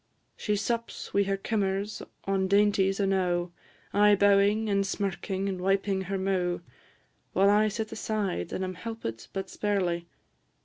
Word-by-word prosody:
She 210 - -1
sups, 230 +3 -3
wi' 200 - +4
her 195 0 0
kimmers, 200 0 -1 0.2
on 195 -1 +1
dainties 200 -1 +3
enow, 180 -3 +1 0.4
Aye 205 0 +6
bowing, 205 +2 +4
and 200 -1 +2
smirking, 195 0 -2
and 190 -2 -3
wiping 195 +1 +1
her 195 - 0
mou'; 185 -2 0 0.7
While 195 +1 +5
I 210 +1 +4
sit 220 +1 -3
aside, 215 - -2
and 190 - -2
am 185 0 -3
helpit 180 - -6
but 195 0 -4
sparely. 180 -4 -1
195 Hz, 140 wpm, -28 LUFS, 190-205 Hz, 0.7 s, Aye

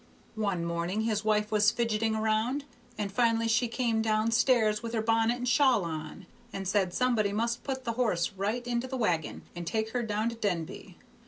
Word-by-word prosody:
"One 185 -5 0
morning 170 +5 -1
his 220 -1 0
wife 210 0 +1
was 210 0 +5
fidgeting 225 -1 0
round, 220 +6 0 0.3
and 205 -2 -3
finally 230 +1 +2
she 230 +2 +2
came 230 -1 0
down 220 0 +1
stairs 230 -3 +3
with 230 0 -5
her 220 - +1
bonnet 225 +1 +2
and 245 0 -4
shawl 250 - +4
on, 160 +3 -6 0.3
and 195 -1 -5
said 195 -2 +1
somebody 225 -2 +1
must 235 +3 -1
put 265 -2 -4
the 235 -2 -2
horse 180 -8 +1
right 205 +5 -2
into 245 +1 -1
the 260 0 -4
wagon 175 -10 -1
and 175 -1 -6
take 220 +2 -1
her 245 - -1
down 215 0 -1
to 235 - -6
Denby. 180 -3 -4
220 Hz, 190 wpm, -29 LUFS, 200-235 Hz, 0.3 s, was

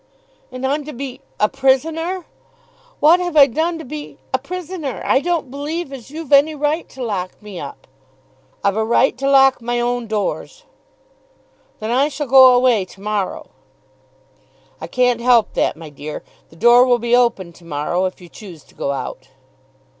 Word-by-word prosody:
"And 255 +1 -5
I'm 290 +3 0
to 305 - -7
be 260 0 -7 0.2
a 210 - +4
prisoner! 320 - 0 0.7
What 325 +4 +5
have 350 -3 -2
I 285 - +9
done 320 +6 -1
to 320 - -9
be 295 +3 -8 0.2
a 260 - +2
prisoner? 330 -1 -6
I - - +3
don't 330 -4 -2
believe 290 +2 -5
as 260 -2 -10
you've 310 0 -8
any 295 +3 +5
right 300 +3 -1
to 260 - -8
lock 190 -5 -4
me 210 -4 -9
up." 140 - -9 0.8
"I've 200 +1 +1
a 220 - +1
right 235 +3 +2
to 275 0 0
lock 270 -2 +5
my 240 +1 -2
own 240 -1 -1
doors." 215 - -3 1.2
"Then 220 +1 -4
I 265 +4 +3
shall 295 0 -4
go 260 -1 +7
away 245 -5 +3
to 185 +1 -15
morrow." 205 -1 -3 1.3
"I - - -5
can't 245 -2 +1
help 240 -2 +3
that, - - 0
my 160 -2 -10
dear. 145 +2 -7 0.3
The - - -18
door 240 +7 +6
will 250 -1 +3
be 240 +1 +1
open 230 -8 +1
to 170 - -19
morrow, 170 +4 -1
if 185 - -4
you 180 - -13
choose 175 -3 -12
to - - -24
go 140 - -3
out." 130 -1 -6
250 Hz, 175 wpm, -19 LUFS, 210-290 Hz, 1.3 s, I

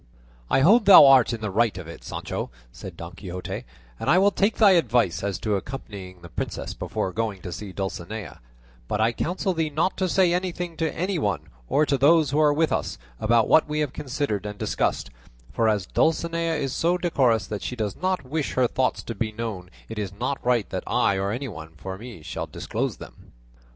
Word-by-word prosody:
"I - - +3
hold 210 - +6
thou 195 -6 +10
art 135 -3 +6
in 115 -2 -4
the 105 -2 -3
right 105 -2 +2
of 90 -3 -7
it, 85 - -10
Sancho," - - -4 0.2
said 90 +4 -10
Don 85 +1 -8
Quixote, 90 +1 -6 0.3
"and - - -2
I 170 - +6
will 200 +2 +5
take 200 +2 +1
thy 210 -3 +7
advice 120 - +2
as 100 -3 -1
to 105 -1 0
accompanying 95 -6 -7
the - - -8
princess - - -4
before 95 - -3
going 110 -3 -2
to 90 - -6
see 95 +3 -6
Dulcinea; 95 - -5 0.5
but 105 - -2
I 110 +2 +3
counsel 185 - -1
thee 160 -2 -1
not 155 +6 0
to 185 -2 0
say 180 -1 +3
anything 180 -1 -2
to 160 -2 0
any 185 0 -2
one, 85 - -2 0.2
or 150 - +3
to 140 -2 0
those 155 +1 +5
who 145 - +1
are 150 -1 +5
with 155 +2 +1
us, - - -2 0.2
about 115 0 +3
what 160 - +4
we 150 0 -1
have 145 -4 -2
considered 130 -7 -3
and 105 0 -6
discussed, - - -1 0.4
for 115 -1 +2
as 105 -4 0
Dulcinea 165 - +1
is 140 -3 -2
so 175 +5 +1
decorous 130 - +2
that 105 0 -5
she 125 - -4
does 105 -4 -3
not 185 -5 -1
wish 150 +2 -2
her 130 - +3
thoughts 130 +2 0
to 115 - -5
be 110 +1 -2
known 105 -5 -5 0.2
it 110 -1 -6
is 100 -3 -3
not 125 +7 -3
right 120 -4 +2
that - - -3
I 100 - +2
or 95 +1 -1
anyone 100 - -5
for 95 +3 -6
me 115 -8 -10
should - - -5
disclose - - -3
them." - - -14
120 Hz, 210 wpm, -25 LUFS, 100-160 Hz, 0.5 s, thou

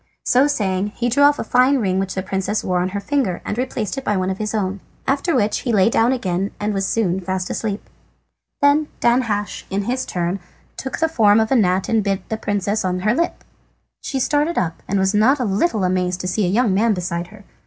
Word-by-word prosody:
So 260 +3 +4
saying 205 -7 -1
he 245 0 0
drew 270 +5 +1
off 290 +1 +6
a - - -3
fine 255 +3 +3
ring 190 -6 0
which 195 -1 -3
the 190 - -2
princess 195 +2 -2
wore 180 -1 0
on 180 +1 0
her 200 +2 -3
finger, 210 -5 -1
and - - -2
replaced 250 0 -2
it - - -10
by 210 - 0
one 185 0 0
of 190 - -5
his 215 +1 -2
own. 195 -2 -1 0.3
After 285 +5 +1
which 210 +1 +1
he 245 - -2
lay 210 0 +4
down 230 +2 +3
again 195 -6 -1
and 210 0 -1
was 195 -1 -1
soon 190 -5 0
fast 185 0 -3
asleep. 210 -2 -3 0.8
Then 290 +1 +4
Danhasch, 230 -4 0
in 200 +1 -1
his 255 +4 -2
turn, 175 +2 -2 0.4
took 265 - -5
the 320 - +2
form 220 -9 +4
of 220 +2 0
a - - +4
gnat 190 -5 +2
and 225 -2 +2
bit 195 -1 -2
the 220 - -2
princess 205 0 -1
on 180 -1 -1
her 215 +3 +2
lip. 335 +7 -1 0.6
She 270 - -3
started 295 +5 +1
up, 165 -2 -1
and 200 - 0
was 190 +1 +2
not 235 +7 +4
a 250 - 0
little 210 - +1
amazed 180 0 0
at 180 - -1
seeing 190 -1 +1
a - - -1
young 230 -4 +3
man 215 +2 +2
beside 175 -1 -3
her. 205 +2 -15
210 Hz, 230 wpm, -20 LUFS, 190-245 Hz, 0.8 s, off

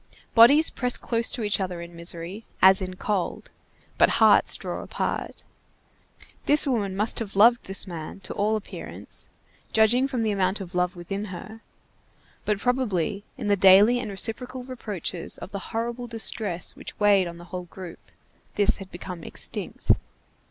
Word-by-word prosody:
Bodies 275 +8 +7
press 250 -1 +1
close 230 -1 +1
to 240 - -3
each 205 -2 +1
other 180 -2 -3
in 170 0 -9
misery, 170 +5 -4 0.2
as 190 +1 +6
in 185 -1 -5
cold, 195 -1 -3 0.5
but - - +6
hearts - - +5
draw - - -5
apart. - - -4 1.0
This 295 +1 +5
woman 210 -8 -1
must 210 +3 0
have 210 -4 -6
loved 235 +4 +5
this 195 0 0
man, 170 0 -7
to - - -4
all 210 +2 +1
appearance, 215 - -7 0.5
judging 235 +4 +4
from 255 -4 -2
the 220 - +1
amount 195 0 0
of 185 -2 -8
love 180 0 0
within 195 +4 -5
her; 215 +3 -9 0.8
but 210 -1 +1
probably, 205 -5 -1
in - - -5
the 205 -1 +3
daily 200 +5 +6
and 235 -3 -4
reciprocal 245 +5 -3
reproaches 205 -9 -5
of - - -9
the 200 - -4
horrible 235 +2 -3
distress 215 -5 -1
which - - -10
weighed 200 -3 +4
on 170 0 -8
the 175 - -12
whole 180 -1 -4
group, 180 -1 -10 0.6
this 205 -1 +3
had 195 -2 -10
become 175 -1 -8
extinct. - - -2
205 Hz, 160 wpm, -25 LUFS, 185-230 Hz, 1.0 s, Bodies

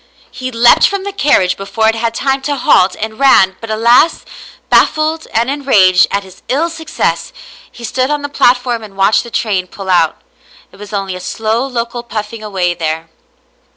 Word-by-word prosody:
He 255 0 -6
leaped 235 0 +5
from 400 -1 -3
the 400 0 -5
carriage 265 - +2
before 200 +3 -1
it 225 - +3
had 225 0 -2
time 270 +1 -1
to 285 +2 -2
halt, 190 -7 +3
and 220 +1 -5
ran, 190 -9 +4
but 225 - -8
alas! 235 +8 +3 0.5
bajffled 315 +1 +2
and 230 +2 0
enraged 210 -11 +3
at 200 0 -2
his 190 -1 -16
ill 320 +6 0
success, 320 -1 -3 0.4
he 240 - -13
stood 255 +3 -1
on 295 -1 -2
the - - -2
platform 245 -3 +1
and 205 -3 -12
watched 195 +2 +3
the 235 - -10
train 200 -5 -1
pull 190 0 -6
out. 165 -3 +2 0.5
It - - -18
was 205 0 -11
only 195 -2 -3
a - - -7
slow 225 +6 -2
local 240 -1 -4
puffing 220 -1 -6
away 190 -4 -1
there. 160 -1 -4
225 Hz, 185 wpm, -14 LUFS, 195-265 Hz, 0.5 s, leaped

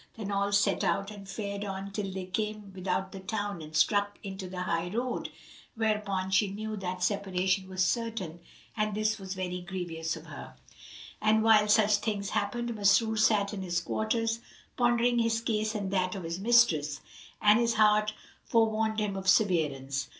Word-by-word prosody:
Then 205 -2 -4
all 200 0 0
set 205 0 +2
out 195 +2 0
and 200 -2 -11
fared 200 0 -4
on 195 0 -5
till 200 -1 -3
they 190 -1 -5
came 210 +1 -4
without 190 0 -2
the 195 - -8
town 205 -2 -3
and 155 0 -9
struck 205 +5 +2
into 190 -1 -6
the 180 0 -4
high 170 -1 -1
road, 245 +5 -2 0.5
whereupon 210 -4 -1
she 195 +1 +3
knew 215 +2 -5
that 180 -1 -4
separation 190 -1 0
was 185 0 +1
certain 225 -9 -2 0.4
and 215 -1 -1
this 215 +1 0
was 190 0 -6
very 180 -1 -3
grievous 175 -3 -4
to - - -7
her. - - -10 0.7
And 220 0 +3
while 215 -2 +5
such 210 -1 +4
things 205 -2 -3
happened 235 +3 -1
Masrur 215 +2 +3
sat 215 -2 +3
in 200 - -4
his 175 -2 -1
quarters, 225 +4 -1 0.4
pondering 240 0 +2
his 230 -1 +1
case 220 -1 -1
and 200 -3 -3
that 185 -1 0
of 190 - -5
his 165 +2 -4
mistress, 195 -10 +3 0.4
and 210 +2 +5
his 235 -1 +1
heart 215 0 +4 0.3
forewarned 220 -1 +1
him 210 -2 -1
of 190 0 -1
severance. 145 -9 +1
200 Hz, 170 wpm, -29 LUFS, 185-215 Hz, 0.7 s, while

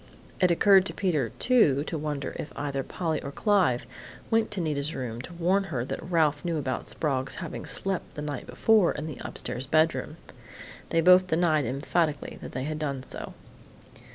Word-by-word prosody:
It 180 - +4
occurred 190 +2 +5
to - - -6
Peter, 155 - 0
too, 160 - +4
to 160 - -5
wonder 150 -2 -3
if 150 - -5
either 140 -2 -2
Polly 160 +2 -2
or 140 - -6
Clive 185 - +2 0.5
went 225 -1 +3
to 205 - -4
Nita's 150 -2 -1
room 120 -2 -4
to 170 +7 -9
warn 180 +4 +1
her 130 -10 -3
that - - -4
Ralph 155 -4 +2
knew 170 -2 -1
about 130 -3 -3
Sprague's 135 -4 -1
having - - -6
slept 195 -2 -2
the 150 - -5
night 145 -3 -5
before 215 -6 +3
in 150 - -5
the 150 -6 -7
upstairs 130 +2 -5
bedroom. 155 +1 +1 0.7
They 165 - +2
both 180 +2 +6
denied 160 -4 +2
emphatically 145 +4 -1
that - - -7
they 130 - -3
had 155 +2 -3
done 140 -4 -3
so. - - -8
155 Hz, 180 wpm, -27 LUFS, 140-180 Hz, 0.7 s, both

